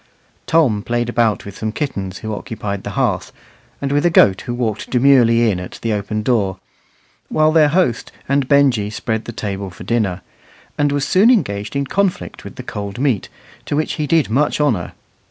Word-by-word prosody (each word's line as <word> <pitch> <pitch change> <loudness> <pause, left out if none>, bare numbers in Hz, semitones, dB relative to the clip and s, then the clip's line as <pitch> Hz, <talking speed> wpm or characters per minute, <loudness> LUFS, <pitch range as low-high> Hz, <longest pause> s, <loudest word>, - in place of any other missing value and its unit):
Tom 135 -11 +3
played 120 +2 -1
about 115 -5 +1
with 100 -1 -9
some 110 0 -2
kittens 100 - -4
who 110 0 -5
occupied 105 -3 -5
the - - -5
hearth, - - 0 0.5
and 140 -1 -2
with 145 +1 +2
a 175 - +4
goat 100 - +4
who 120 - -5
walked 110 -4 -2
demurely 120 -3 +4
in 90 - -2
at 90 - -8
the 115 -1 0
open 105 +1 -2
door 105 -6 +1 0.7
while 155 0 +3
their 155 -2 +5
host 145 -7 0 0.2
and 140 -1 +1
Benjy 135 -8 +3
spread 110 +1 -3
the - - -5
table 100 -3 -4
for 90 - -11
dinner 100 -6 -1 0.5
and 145 -1 +1
was 145 -1 -1
soon 195 +5 +5
engaged 105 - 0
in 140 0 0
conflict 195 +5 -2
with - - -10
the 130 - -8
cold 100 -4 -6
meat, 125 -6 0 0.4
to - - -1
which 155 +1 0
he 150 - -2
did 160 -1 +3
much 145 +8 +1
honour. 120 - 0
120 Hz, 190 wpm, -18 LUFS, 105-145 Hz, 0.7 s, their